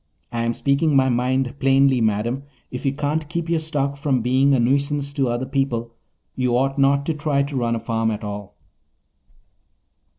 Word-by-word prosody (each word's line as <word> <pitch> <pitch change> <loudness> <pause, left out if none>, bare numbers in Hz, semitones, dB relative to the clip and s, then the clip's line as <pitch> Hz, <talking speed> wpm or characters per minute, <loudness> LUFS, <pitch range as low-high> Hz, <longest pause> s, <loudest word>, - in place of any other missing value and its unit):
I 120 -1 -2
am 115 - 0
speaking 140 +4 +1
my 130 -1 +4
mind 125 +1 0
plainly, 135 -2 +3
madam. 110 +4 0 0.3
If 125 +2 -4
you - - +3
can't 150 +2 -2
keep 170 0 -3
your 165 -1 +2
stock 140 -3 -2
from 140 -5 0
being 135 +3 +3
a - - +2
nuisance 140 +3 0
to 135 -2 0
other 120 +2 -1
people 130 -4 -1 0.4
you 125 -1 +1
ought 135 +2 0
not 140 +1 +3
to 160 - 0
try 150 -2 0
to 140 0 -5
run 120 -2 0
a - - -2
farm 115 0 -1
at 105 -1 -4
all." 105 -1 -6
135 Hz, 185 wpm, -22 LUFS, 120-140 Hz, 0.4 s, my